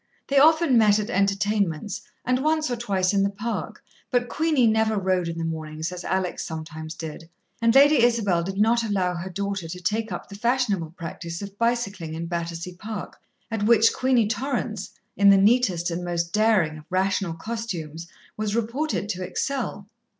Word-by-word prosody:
They 275 0 +4
often 315 -3 +5
met 210 -2 +5
at 215 +2 -3
entertainments, 200 -3 0 0.2
and 255 +1 +1
once 310 -2 +1
or - - +1
twice 195 -5 0
in 200 - +3
the 195 - +2
Park, 210 +4 -5 0.3
but 245 -1 0
Queenie 310 -5 +2
never 220 -1 +2
rode 185 -2 +1
in 165 0 -4
the 165 - -2
mornings, 160 0 -4
as 180 0 -7
Alex 185 -1 -1
sometimes 160 0 -6
did, 160 0 -8 0.3
and 230 +1 +3
Lady 285 0 +7
Isabel 225 -7 +3
did 195 +3 -4
not 230 +3 +3
allow 190 -5 0
her 175 +2 -5
daughter 200 -1 -3
to 180 +2 -6
take 215 +4 -1
up 175 - -5
the - - -12
fashionable 210 -6 0
practice 170 +1 -6
of 200 0 -8
bicycling 200 -9 -1
in 165 +1 -4
Battersea 170 +1 -4
Park, 210 +2 -7 0.3
at 225 -2 -2
which 225 -1 +5
Queenie 255 -4 +2
Torrance, 235 -4 -2 0.3
in 200 0 +5
the 195 - +7
neatest 195 -5 +3
and 170 +1 -3
most 170 -1 -2
daring 210 -8 +2
of 150 - -15
rational 185 -2 0
costumes, 170 -5 -5 0.3
was 215 0 -2
reported 235 +1 -1
to 185 -3 -3
excel. 235 -2 -3
200 Hz, 175 wpm, -24 LUFS, 175-230 Hz, 0.3 s, Lady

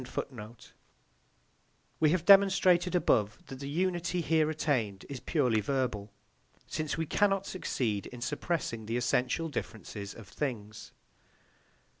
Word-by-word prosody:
" - - -40
We 155 - +4
have 170 +1 +1
demonstrated 190 -3 +6
above 105 - +2
that 135 -2 -9
the 140 0 -5
unity 175 +2 0
here 160 -2 +2
attained 120 -11 -1
is 140 -2 -5
purely 125 -9 +1
verbal, 110 -4 -2 0.5
since 155 -1 -3
we 160 - -1
cannot 195 +3 +2
succeed 115 - -2
in 125 - -10
suppressing 135 -5 -2
the 115 +2 -1
essential 125 +6 +1
differences 110 -7 -6
of 115 -4 -11
things. 110 -5 -5
140 Hz, 120 wpm, -30 LUFS, 110-170 Hz, 0.5 s, demonstrated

